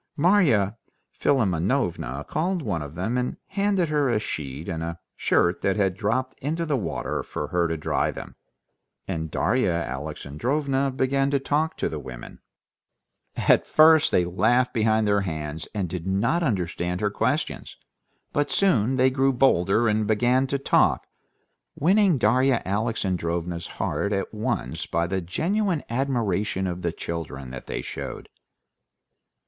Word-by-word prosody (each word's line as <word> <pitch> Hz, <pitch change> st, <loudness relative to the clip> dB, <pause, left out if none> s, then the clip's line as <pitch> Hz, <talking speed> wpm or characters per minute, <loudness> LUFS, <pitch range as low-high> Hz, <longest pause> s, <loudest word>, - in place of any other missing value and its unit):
Marya 140 Hz, -, +3 dB, 0.3 s
Philimonovna 90 Hz, -, 0 dB
called 175 Hz, +2 st, -1 dB
one 90 Hz, -, -2 dB
of 75 Hz, +1 st, -8 dB
them 110 Hz, +8 st, -1 dB
and 125 Hz, -, -2 dB
handed 195 Hz, -3 st, +1 dB
her 145 Hz, -3 st, +2 dB
a 120 Hz, -, +2 dB
sheet 75 Hz, -5 st, -5 dB
and 80 Hz, -1 st, -3 dB
a 85 Hz, +1 st, -4 dB, 0.2 s
shirt 85 Hz, +1 st, +2 dB
that 95 Hz, -, +1 dB
had 95 Hz, -3 st, +1 dB
dropped 125 Hz, +6 st, -1 dB
into 160 Hz, +5 st, -2 dB
the 150 Hz, -3 st, 0 dB
water 105 Hz, -10 st, -2 dB
for -, -, -5 dB
her 85 Hz, -1 st, +1 dB
to 80 Hz, 0 st, -2 dB
dry 75 Hz, -, 0 dB
them, -, -, -8 dB, 0.7 s
and 80 Hz, -1 st, -3 dB
Darya 120 Hz, +3 st, +1 dB
Alexandrovna 85 Hz, -, -2 dB
began 135 Hz, +1 st, +1 dB
to 140 Hz, -, +2 dB
talk 150 Hz, +4 st, 0 dB
to -, -, 0 dB
the 80 Hz, -, -4 dB
women. 65 Hz, -3 st, -9 dB, 1.0 s
At -, -, +3 dB
first 155 Hz, 0 st, +6 dB
they 90 Hz, -, +3 dB
laughed 120 Hz, +8 st, +2 dB
behind 110 Hz, -1 st, +2 dB
their 100 Hz, 0 st, +3 dB
hands 80 Hz, -4 st, -4 dB
and 100 Hz, -4 st, -2 dB
did 90 Hz, +1 st, -5 dB
not 110 Hz, -, +1 dB
understand 90 Hz, -, -1 dB
her 105 Hz, 0 st, 0 dB
questions, 130 Hz, +9 st, -2 dB, 0.6 s
but 145 Hz, 0 st, +1 dB
soon 130 Hz, -, +2 dB
they 130 Hz, 0 st, +4 dB
grew 135 Hz, +1 st, +2 dB
bolder 115 Hz, -4 st, +3 dB
and 105 Hz, -1 st, +1 dB
began 120 Hz, +5 st, +2 dB
to 140 Hz, -, 0 dB
talk, 140 Hz, -, +2 dB, 0.7 s
winning 190 Hz, +1 st, +3 dB
Darya 125 Hz, +2 st, +3 dB
Alexandrovna's 90 Hz, -5 st, -2 dB
heart 100 Hz, +1 st, -1 dB
at 100 Hz, +2 st, -2 dB
once 105 Hz, -, -3 dB
by 85 Hz, +1 st, 0 dB
the 95 Hz, +2 st, -2 dB
genuine 175 Hz, -, -1 dB
admiration 110 Hz, -7 st, 0 dB
of 90 Hz, -1 st, -3 dB
the 85 Hz, -, -1 dB
children 75 Hz, -6 st, -6 dB
that 65 Hz, -, -8 dB
they -, -, -4 dB
showed. -, -, -7 dB
105 Hz, 145 wpm, -25 LUFS, 85-135 Hz, 1.0 s, first